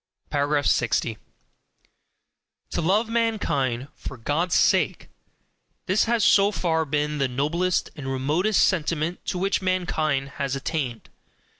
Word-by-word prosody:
60. 115 -3 +1 1.5
To - - -1
love 200 +7 +2
mankind 175 - 0
FOR 135 - -8
GOD'S 155 +9 0
SAKE - - +2 0.8
this 195 +1 +2
has 230 -2 +2
so 200 0 +5
far 160 -5 0
been 150 +1 -1
the 135 - +2
noblest 155 +8 0
and 145 -4 -7
remotest 155 +11 +2
sentiment 165 -1 -1
to - - -2
which 195 +2 0
mankind 155 -7 0
has 140 -1 -1
attained. 135 -4 -4
160 Hz, 115 wpm, -24 LUFS, 135-185 Hz, 1.5 s, so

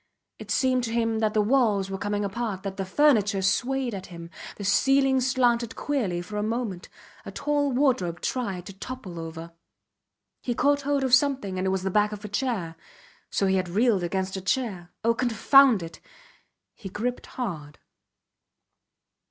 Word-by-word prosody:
It - - -10
seemed 255 -1 +2
to 225 - -4
him 225 -1 0
that 215 -1 0
the 210 - +4
walls 210 -5 +2
were 195 - -3
coming 205 +1 -1
apart, 200 -1 -3
that 195 -1 -5
the 195 - -2
furniture 205 -5 +3
swayed 250 +6 0
at 190 -2 -6
him; 170 -1 -10 0.2
the 205 - -8
ceiling 270 +6 +3
slanted 245 -3 +1
queerly 205 -12 -2
for 210 +4 -7
a - - 0
moment, 220 -4 -3 0.3
a - - -8
tall 290 -1 0
wardrobe 245 - +1
tried 195 -9 -3
to 195 - -9
topple 195 -4 -8
over. 165 +1 -7 0.9
He 245 - -2
caught 285 +2 +2
hold 280 0 0
of 260 -2 -1
something 260 -9 +2
and 190 - -1
it - - +2
was 190 -1 -1
the 190 - -1
back 210 +2 +2
of 210 0 -7
a - - -6
chair. 200 -7 -2 0.5
So 200 - 0
he 190 0 +2
had 185 -1 -2
reeled 210 +1 +2
against 190 +2 -2
a 190 - -4
chair! 195 -4 -2
Oh! 230 +1 +3
Confound 245 -1 +4
it! 165 - -9 0.7
He 195 - -9
gripped 240 +6 -3
hard. 160 - -5
210 Hz, 175 wpm, -26 LUFS, 190-255 Hz, 0.9 s, the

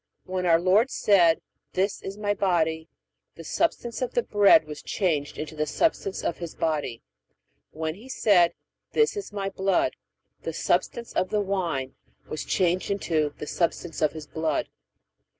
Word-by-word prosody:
When 185 -1 -2
our 165 -1 +5
Lord 195 +8 +4
said, 175 -9 +4 0.3
This 195 +2 0
is 195 +1 -6
My 205 -1 0
body, 160 -5 0 0.5
the - - -10
substance 255 -7 -1
of 255 - -2
the 485 - +3
bread 205 - +5
was 150 -1 -8
changed 155 -7 -1
into 155 0 -5
the 155 0 -1
substance 200 - 0
of 170 - -2
His 170 -2 -6
body; 150 -7 -2 0.7
when 160 0 -3
He 220 +9 -14
said, 185 -9 +4 0.4
This 450 -1 +3
is 405 - -5
My 195 -1 -3
blood, 195 +14 +1 0.5
the - - -4
substance 235 -1 -1
of 185 - 0
the 210 - +1
wine 175 -10 -2 0.3
was 155 - -4
changed 180 0 +1
into 160 -7 0
the - - -5
substance 170 +1 -2
of 155 -2 +2
His 155 -1 -7
blood. 160 -1 -1
180 Hz, 160 wpm, -26 LUFS, 160-205 Hz, 0.7 s, our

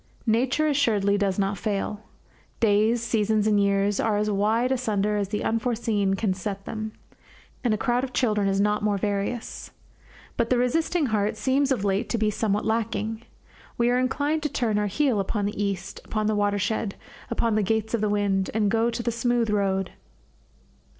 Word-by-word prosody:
Nature 255 +6 +2
assuredly 215 -9 +2
does 200 -2 0
not 195 -1 0
fail. 210 0 -2 0.6
Days, 220 +2 +3
seasons, 215 -2 +1
and 210 -1 +3
years 200 0 +2
are 215 -2 +1
as 210 0 0
wide 220 +5 +1
asunder 210 -5 0
as 205 -1 0
the 210 0 -2
unforeseen 225 -4 0
can 195 -1 0
set 195 +1 -5
them, 215 0 -4 0.7
and 240 - +2
a 215 - +2
crowd 245 +4 0
of 265 - -3
children 210 -6 +1
is 195 0 +1
not 210 +1 +2
more 205 -1 +1
various. 205 +4 -3 0.7
But 230 - +1
the 255 - +3
resisting 315 +6 +1
heart 210 +1 0
seems 275 +3 +1
of 240 -7 0
late 200 +3 0
to 235 - 0
be 215 -1 +1
somewhat 210 0 -1
lacking. 225 0 -1 0.6
We 240 +1 +3
are 250 - +2
inclined 290 +4 0
to 300 - -1
turn 230 -6 0
our 210 - 0
heel 250 +1 +1
upon 200 +1 -1
the 205 0 -2
East, 195 -2 -3
upon 215 -1 -2
the 215 - +2
watershed, 205 0 0 0.3
upon 230 -1 0
the 215 - +2
gates 220 +2 -1
of 230 - +1
the 210 - +1
wind, 200 -2 +1
and 210 -2 +2
to - - +2
go 225 +1 +2
the 235 0 -2
smooth 235 -1 0
road. 195 -2 0
215 Hz, 185 wpm, -25 LUFS, 205-235 Hz, 0.7 s, Days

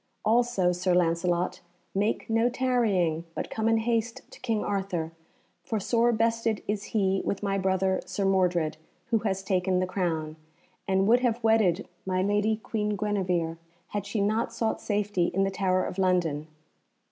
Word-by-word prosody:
"Also, 225 -5 +3
Sir 180 0 +1
Lancelot, 175 +1 +1 0.3
make 205 +3 0
no 225 +2 +2
tarrying, 220 -11 +1
but - - -4
come 220 0 0
in 225 - +4
haste 230 0 -1
to - - -13
King 225 -4 -1
Arthur, 190 -5 -2 0.5
for 220 - -2
sore 235 +4 +2
bested 230 -1 0
is 205 -1 -2
he 195 -3 +1
with 200 - -2
my 195 -1 0
brother 190 0 +1
Sir 200 - -2
Mordred, 180 -5 +2 0.3
who 225 - +4
has 195 -3 -2
taken 185 -1 +1
the 185 - +1
crown, 160 -4 -2 0.5
and 190 0 +2
would 240 +3 +6
have 240 -2 0
wedded 210 -4 +3 0.2
my 185 0 0
lady 205 +2 +2
Queen 210 -1 -2
Guenevere 185 -5 -1 0.3
had 205 -1 -3
she 205 0 -1
not 215 +3 +1
sought 225 -1 -1
safety 205 -4 0
in 195 - +3
the 195 - 0
Tower 185 -1 +1
of 190 - -5
London. 170 -5 +1
195 Hz, 160 wpm, -27 LUFS, 185-220 Hz, 0.5 s, would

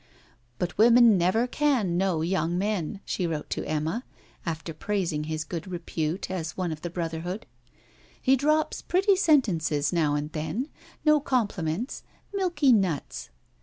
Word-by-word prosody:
'But 175 +6 -3
women 235 -1 +7
never 185 +6 +2
can 250 -9 +1
know 180 -3 +1
young 175 -1 0
men,' 200 -1 -2
she 180 - -1
wrote 155 -2 -4
to - - -2
Emma, 155 - -1 0.4
after 165 0 -3
praising 165 -3 -2
his 155 0 -3
good 170 +2 -6
repute 170 -1 -3
as 165 -4 -4
one 180 -3 -1
of 155 -1 -6
the 175 - -4
brotherhood. 170 +3 -4 0.7
'He 265 - +4
drops 305 +3 +1
pretty 390 +2 +3
sentences 175 - +2
now 155 -4 +2
and 150 +1 -3
then: 160 - -3 0.4
no 305 0 +6
compliments; 220 - -1 0.3
milky 345 -8 +2
nuts. 185 -9 -1
180 Hz, 140 wpm, -27 LUFS, 160-240 Hz, 0.7 s, women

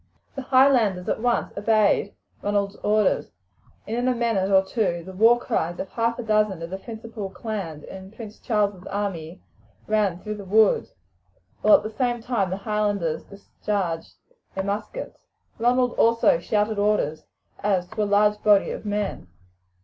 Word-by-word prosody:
The 275 - -5
Highlanders 255 -8 +3
at - - 0
once 240 +1 0
obeyed 205 -1 +2 0.3
Ronald's 200 0 -1
orders, 210 -1 +1 0.6
and 220 - -3
in 245 +1 0
a 255 - +2
minute 225 -5 0
or 190 -1 +5
two 190 -5 -1
the 190 - -9
war 225 +5 +5
cries 175 -8 -2
of 190 - -4
half 230 0 -1
a 245 - -4
dozen 210 -5 +1
of 165 - -7
the 190 - -4
principal 225 -2 -7
clans 185 -5 -5
in 190 0 -10
Prince 220 0 -10
Charles's 205 -5 -1
army 180 - -4 0.4
rang 210 -5 +1
through 210 +3 -6
the 205 - -8
woods, 210 +2 +3 0.7
while 210 - +7
at - - +2
the 215 - -5
same 240 +1 -1
time 225 -5 -1
the 190 - -3
Highlanders 205 -6 -1
discharged 200 -4 -4 0.4
their 190 - -1
muskets. 210 - -5 0.4
Ronald 245 +1 +2
also 230 -7 +4
shouted 210 +4 0
orders, 205 -7 0 0.3
as 195 -3 +1
to 215 - -4
a - - +2
large 210 +1 +3
body 205 -2 +4
of - - -6
men. 205 - -3
210 Hz, 160 wpm, -24 LUFS, 190-225 Hz, 0.7 s, while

